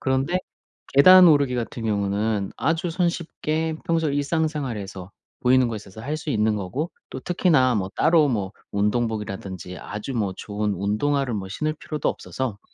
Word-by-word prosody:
그런데 135 Hz, +7 st, +1 dB, 0.6 s
계단 180 Hz, +5 st, +9 dB
오르기 140 Hz, -4 st, +4 dB
같은 120 Hz, 0 st, -4 dB
경우는 100 Hz, 0 st, 0 dB
아주 165 Hz, +1 st, 0 dB
손쉽게 160 Hz, -2 st, -1 dB
평소 165 Hz, -2 st, +1 dB
일상생활에서 140 Hz, -, -2 dB, 0.3 s
보이는 130 Hz, -1 st, +4 dB
곳에서 105 Hz, -2 st, -7 dB
할 145 Hz, +6 st, -3 dB
수 155 Hz, -1 st, -5 dB
있는 110 Hz, -2 st, +2 dB
거고 105 Hz, -, -3 dB, 0.2 s
또 130 Hz, -, -6 dB
특히나 150 Hz, -8 st, +3 dB
뭐 95 Hz, -2 st, -1 dB
따로 155 Hz, -2 st, +4 dB
뭐 100 Hz, -5 st, -2 dB, 0.2 s
운동복이라든지 100 Hz, -4 st, -2 dB
아주 105 Hz, +7 st, -6 dB
뭐 100 Hz, -5 st, 0 dB
좋은 105 Hz, 0 st, -2 dB
운동화를 120 Hz, +7 st, 0 dB
뭐 95 Hz, -2 st, -4 dB
신을 155 Hz, +10 st, -2 dB
필요도 150 Hz, -1 st, -3 dB
없어서 125 Hz, -6 st, -4 dB
125 Hz, 335 characters per minute, -24 LUFS, 105-155 Hz, 0.6 s, 계단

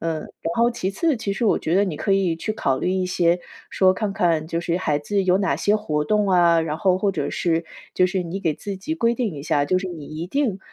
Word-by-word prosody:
嗯， 165 Hz, -1 st, -2 dB
然 165 Hz, +2 st, -6 dB
后 235 Hz, +1 st, +4 dB
其 195 Hz, -5 st, -2 dB
次， 310 Hz, -, 0 dB
其 210 Hz, -3 st, -3 dB
实 230 Hz, +4 st, -2 dB
我 210 Hz, -, +3 dB
觉 165 Hz, -, -1 dB
得 200 Hz, -, +4 dB
你 170 Hz, -6 st, -3 dB
可 155 Hz, -, -2 dB
以 190 Hz, -4 st, +2 dB
去 215 Hz, +6 st, -3 dB
考 135 Hz, -11 st, 0 dB
虑 180 Hz, -, -1 dB
一 185 Hz, -1 st, 0 dB
些 175 Hz, -1 st, +2 dB, 0.3 s
说 185 Hz, -1 st, +3 dB
看 210 Hz, -2 st, -2 dB
看 165 Hz, -4 st, +1 dB
就 165 Hz, 0 st, -1 dB
是 170 Hz, 0 st, -1 dB
孩 150 Hz, -5 st, 0 dB
子 195 Hz, +7 st, -1 dB
有 185 Hz, +1 st, +3 dB
哪 195 Hz, -, +1 dB
些 210 Hz, +1 st, +2 dB
活 150 Hz, -8 st, -2 dB
动 210 Hz, +2 st, +1 dB
啊， 170 Hz, -2 st, +4 dB
然 155 Hz, -1 st, -2 dB
后 185 Hz, -1 st, +2 dB
或 195 Hz, 0 st, +1 dB
者 -, -, -2 dB
是 165 Hz, -1 st, 0 dB, 0.3 s
就 185 Hz, -, +4 dB
是 185 Hz, -1 st, -1 dB
你 185 Hz, +4 st, -5 dB
给 160 Hz, -4 st, +1 dB
自 200 Hz, +5 st, -6 dB
己 315 Hz, +12 st, -4 dB
规 235 Hz, -5 st, +2 dB
定 235 Hz, -6 st, -2 dB
一 140 Hz, -, -7 dB
下， 150 Hz, -3 st, +1 dB
就 185 Hz, +5 st, +1 dB
是 190 Hz, -, -4 dB
你 165 Hz, -5 st, -7 dB
一 160 Hz, +3 st, -6 dB
定 240 Hz, -4 st, -1 dB
185 Hz, 285 characters per minute, -22 LUFS, 165-200 Hz, 0.3 s, 后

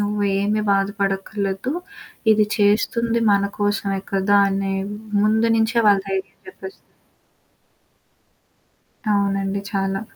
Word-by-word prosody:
నువ్వేమి 205 Hz, 0 st, 0 dB
బాధపడక్కరలేదు. 195 Hz, +2 st, -1 dB, 0.6 s
ఇది 210 Hz, -1 st, +3 dB
చేస్తుంది 230 Hz, +3 st, +2 dB
మన 200 Hz, 0 st, +2 dB, 0.2 s
కోసమే 200 Hz, -1 st, 0 dB
కదా! 195 Hz, +1 st, +3 dB
అని 195 Hz, 0 st, -1 dB, 0.5 s
ముందు 220 Hz, +2 st, +2 dB
నుంచే 225 Hz, +2 st, +1 dB
వాళ్ళ 200 Hz, -1 st, +4 dB
దైర్యం 190 Hz, 0 st, -4 dB
చెప్పేస్తరు. 385 Hz, +1 st, -10 dB, 2.3 s
అవునండి. 200 Hz, -1 st, 0 dB
చాలా. 195 Hz, 0 st, -1 dB
200 Hz, 90 wpm, -21 LUFS, 195-215 Hz, 2.3 s, వాళ్ళ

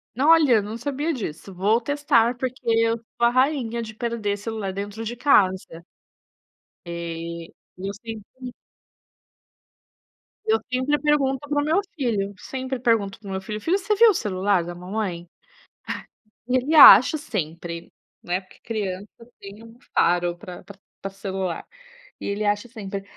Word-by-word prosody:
N 260 Hz, -, -1 dB
olha, 315 Hz, -5 st, +6 dB
eu 210 Hz, -, +4 dB
não 215 Hz, +3 st, -6 dB
sabia 285 Hz, +6 st, -2 dB
disso, 195 Hz, -, -6 dB
vou 205 Hz, +6 st, +2 dB
testar, 255 Hz, -3 st, +2 dB
porque 255 Hz, +1 st, -4 dB
eu 230 Hz, 0 st, +2 dB
sou 235 Hz, +1 st, -3 dB
a -, -, +4 dB
rainha 255 Hz, -3 st, +1 dB
de 220 Hz, -1 st, -8 dB
perder 220 Hz, -4 st, -2 dB
celular 210 Hz, -2 st, -4 dB
dentro 205 Hz, +3 st, -5 dB
de 240 Hz, +2 st, -4 dB
casa. 190 Hz, -, +2 dB, 1.0 s
E 170 Hz, -1 st, -6 dB, 0.2 s
eu 195 Hz, +2 st, -4 dB
sempre 225 Hz, +4 st, -9 dB, 1.9 s
Eu 440 Hz, 0 st, +3 dB
sempre 260 Hz, +4 st, +1 dB
pergunto 275 Hz, -3 st, +2 dB
para 290 Hz, 0 st, +1 dB
o -, -, -2 dB
meu 330 Hz, +6 st, +2 dB
filho. 210 Hz, -8 st, -1 dB
Sempre 260 Hz, +2 st, -5 dB
pergunto 220 Hz, -5 st, +1 dB
para 205 Hz, -, -13 dB
o -, -, -5 dB
meu 190 Hz, 0 st, -3 dB
filho: 210 Hz, +2 st, -6 dB
"Filho, 365 Hz, +4 st, +2 dB
você 410 Hz, +2 st, 0 dB
viu 460 Hz, +2 st, +7 dB
o -, -, +4 dB
celular 195 Hz, -, 0 dB
da 175 Hz, +1 st, -6 dB
mamãe?" 180 Hz, -2 st, -4 dB
Ah, -, -, -104 dB, 1.1 s
e 255 Hz, +1 st, +3 dB
ele 290 Hz, +6 st, 0 dB
acha 285 Hz, +1 st, +10 dB
sempre, 170 Hz, -, -5 dB, 0.3 s
né, 180 Hz, +2 st, -1 dB
porque 185 Hz, -, -21 dB
criança 205 Hz, -3 st, -4 dB, 0.3 s
tem 200 Hz, +3 st, -11 dB
um 230 Hz, +1 st, -15 dB, 0.2 s
faro 175 Hz, 0 st, +2 dB
pra 180 Hz, 0 st, -10 dB
pra 200 Hz, -1 st, -13 dB, 0.2 s
pra 195 Hz, -, -4 dB
celular, 190 Hz, -3 st, -4 dB, 0.5 s
e -, -, -7 dB
ele 200 Hz, +1 st, -2 dB
acha 205 Hz, +3 st, 0 dB
sempre. 200 Hz, -4 st, -6 dB
220 Hz, 160 wpm, -24 LUFS, 190-255 Hz, 1.9 s, acha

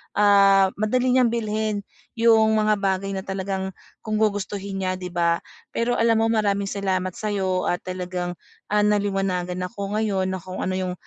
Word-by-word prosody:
ah, 200 Hz, -1 st, +5 dB
madali 250 Hz, +4 st, +1 dB
niyang 250 Hz, -2 st, +4 dB
bilhin 215 Hz, -2 st, -1 dB, 0.4 s
yung 220 Hz, -1 st, +5 dB
mga 215 Hz, 0 st, +3 dB
bagay 195 Hz, 0 st, 0 dB
na 190 Hz, 0 st, -4 dB
talagang 190 Hz, 0 st, -3 dB, 0.3 s
kung 215 Hz, -1 st, -1 dB
gugustuhin 200 Hz, -1 st, -1 dB
niya, 185 Hz, 0 st, 0 dB
'di 180 Hz, -1 st, -5 dB
ba? 170 Hz, -1 st, +1 dB, 0.3 s
Pero 240 Hz, +1 st, 0 dB
alam 225 Hz, -1 st, +3 dB
mo 225 Hz, -, +3 dB
maraming 200 Hz, -2 st, +1 dB
salamat 185 Hz, -2 st, -1 dB
sa 215 Hz, -, -3 dB
'yo 185 Hz, -2 st, 0 dB
at 175 Hz, -, 0 dB
talagang, 180 Hz, -1 st, -4 dB, 0.4 s
ah, 210 Hz, 0 st, +3 dB
naliwanagan 195 Hz, -3 st, 0 dB
ako 200 Hz, 0 st, -4 dB
ngayon 195 Hz, -4 st, 0 dB
na 190 Hz, -, -3 dB
kung 185 Hz, +2 st, -6 dB
ano 185 Hz, -, -1 dB
yung, 185 Hz, -1 st, -2 dB
195 Hz, 170 wpm, -23 LUFS, 185-215 Hz, 0.4 s, ah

